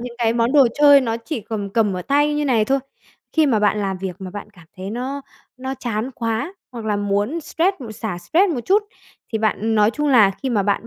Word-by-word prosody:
những 245 Hz, 0 st, -7 dB
cái 230 Hz, -1 st, +2 dB
món 235 Hz, +1 st, +1 dB
đồ 280 Hz, -4 st, +6 dB
chơi 285 Hz, -1 st, +7 dB
nó 230 Hz, -3 st, -1 dB
chỉ 230 Hz, +3 st, -5 dB
cầm 205 Hz, -2 st, -5 dB
cầm 210 Hz, -3 st, +1 dB
ở 180 Hz, -, -4 dB
tay 290 Hz, +6 st, +2 dB
như 295 Hz, 0 st, 0 dB
này 235 Hz, -6 st, +2 dB
thôi, 270 Hz, +4 st, +1 dB, 0.5 s
khi 315 Hz, -2 st, +3 dB
mà 230 Hz, -6 st, +2 dB
bạn 210 Hz, 0 st, +2 dB
làm 195 Hz, -2 st, -2 dB
việc 185 Hz, -2 st, -5 dB
mà 190 Hz, -2 st, -7 dB
bạn 205 Hz, +2 st, -8 dB
cảm 175 Hz, -4 st, -17 dB
thấy 190 Hz, +1 st, -6 dB
nó 260 Hz, +5 st, -4 dB, 0.4 s
nó 260 Hz, +1 st, -4 dB
chán 235 Hz, 0 st, -3 dB
quá 230 Hz, -, -2 dB, 0.2 s
hoặc 230 Hz, -2 st, -7 dB
là 210 Hz, -1 st, 0 dB
muốn 205 Hz, +9 st, -1 dB
stress 340 Hz, +5 st, 0 dB
m 235 Hz, -4 st, -7 dB
xả 215 Hz, -4 st, -5 dB
stress 355 Hz, -, +2 dB
một 245 Hz, -, -2 dB
chút 410 Hz, +3 st, +3 dB, 0.5 s
thì 220 Hz, -, 0 dB
bạn 220 Hz, 0 st, 0 dB
nói 210 Hz, 0 st, +4 dB
chung 295 Hz, +5 st, -1 dB
là 220 Hz, -7 st, +6 dB
khi 260 Hz, +7 st, -5 dB
mà 210 Hz, -4 st, +2 dB
bạn 205 Hz, +3 st, -1 dB
230 Hz, 245 wpm, -21 LUFS, 210-275 Hz, 0.5 s, chơi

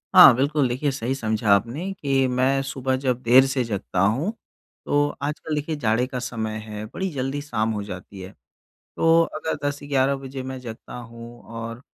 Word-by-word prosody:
हाँ, 175 Hz, -9 st, +11 dB
बिल्कुल 140 Hz, +1 st, +2 dB
देखिए 135 Hz, +4 st, 0 dB
सही 130 Hz, 0 st, -2 dB
समझा 110 Hz, -3 st, -1 dB
आपने 135 Hz, -, -2 dB
कि 135 Hz, -6 st, +1 dB
मैं 130 Hz, +2 st, +2 dB
सुबह 130 Hz, -1 st, -1 dB
जब 130 Hz, -2 st, -1 dB
देर 130 Hz, +3 st, +6 dB
से 130 Hz, -1 st, 0 dB
जगता 100 Hz, -4 st, -3 dB
हूँ 115 Hz, -, +2 dB, 0.5 s
तो 145 Hz, 0 st, +2 dB
आजकल 150 Hz, +2 st, -3 dB
देखिए 150 Hz, +2 st, -2 dB
जाड़े 115 Hz, -3 st, +1 dB
का 130 Hz, -1 st, -4 dB
समय 110 Hz, -3 st, -3 dB
है, 105 Hz, 0 st, -6 dB
बड़ी 190 Hz, -, -4 dB
जल्दी 135 Hz, 0 st, -2 dB
शाम 110 Hz, -6 st, -1 dB
हो 105 Hz, -1 st, -3 dB
जाती 95 Hz, 0 st, -9 dB
है। 95 Hz, +2 st, -8 dB, 0.7 s
तो 165 Hz, 0 st, +5 dB
अगर 155 Hz, +1 st, -2 dB
10-11 140 Hz, -1 st, 0 dB
बजे 135 Hz, -1 st, -7 dB
मैं 130 Hz, 0 st, -6 dB
जगता 115 Hz, -3 st, -9 dB
हूँ 120 Hz, 0 st, -10 dB
और 115 Hz, +1 st, -7 dB
130 Hz, 175 wpm, -24 LUFS, 115-140 Hz, 0.7 s, हाँ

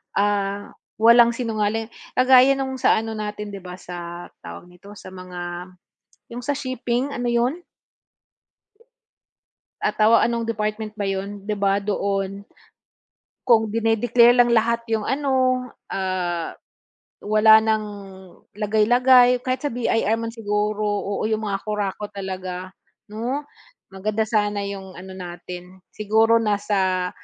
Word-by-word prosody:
ah, 200 Hz, 0 st, 0 dB, 0.2 s
walang 235 Hz, +2 st, +6 dB
sinungaling. 225 Hz, -1 st, -2 dB, 0.2 s
Kagaya 255 Hz, +1 st, +6 dB
no'ng 265 Hz, -1 st, -4 dB
sa 255 Hz, -, +4 dB
ano 225 Hz, 0 st, -5 dB
natin, 210 Hz, -1 st, -5 dB
'di 200 Hz, -, -7 dB
ba, 180 Hz, -1 st, -9 dB
sa, 175 Hz, -1 st, -8 dB
tawag -, -, -10 dB
nito, 200 Hz, +4 st, -14 dB
sa 185 Hz, -, -11 dB
mga, 180 Hz, -1 st, -7 dB, 0.6 s
'yong 245 Hz, -, -5 dB
sa 285 Hz, 0 st, -1 dB
shipping, 255 Hz, 0 st, -2 dB
ano 245 Hz, -1 st, -2 dB
'yon? 245 Hz, +9 st, 0 dB, 2.2 s
Ah, -, -, +2 dB
tawa 220 Hz, +2 st, +5 dB
ano'ng 235 Hz, -1 st, -1 dB
department 215 Hz, -1 st, -3 dB
ba 210 Hz, -, -3 dB
'yon, 195 Hz, +1 st, -4 dB
'di 210 Hz, +1 st, -2 dB
ba, 200 Hz, 0 st, +2 dB
doon. 195 Hz, -1 st, -2 dB, 1.0 s
Kung 220 Hz, -3 st, +4 dB
dine-declare 230 Hz, +2 st, +4 dB
lang 245 Hz, -1 st, +4 dB
lahat 235 Hz, +1 st, +2 dB
'yong 220 Hz, -2 st, 0 dB
ano, 260 Hz, -2 st, +1 dB, 0.2 s
ah, 180 Hz, -3 st, -2 dB, 0.7 s
wala 215 Hz, +1 st, +6 dB
ng 220 Hz, -1 st, 0 dB, 0.7 s
lagay-lagay. 245 Hz, +4 st, +4 dB
Kahit 255 Hz, 0 st, -1 dB
sa -, -, +1 dB
BIR 225 Hz, -2 st, +1 dB
man 230 Hz, 0 st, -4 dB
siguro, 210 Hz, -1 st, -1 dB
oo, 205 Hz, -1 st, -2 dB
'yong 220 Hz, 0 st, 0 dB
mga 200 Hz, -2 st, -3 dB
kurakot 210 Hz, -1 st, -3 dB
talaga, 185 Hz, -2 st, -5 dB, 0.4 s
'no. 235 Hz, +7 st, -3 dB, 0.5 s
Maganda 205 Hz, +3 st, -2 dB
sana 205 Hz, -2 st, 0 dB
'yong 195 Hz, -1 st, -6 dB
ano 190 Hz, +1 st, -9 dB
natin, 180 Hz, +1 st, -9 dB
siguro 220 Hz, +2 st, +3 dB
nasa 195 Hz, -4 st, 0 dB
215 Hz, 125 wpm, -22 LUFS, 195-235 Hz, 2.2 s, walang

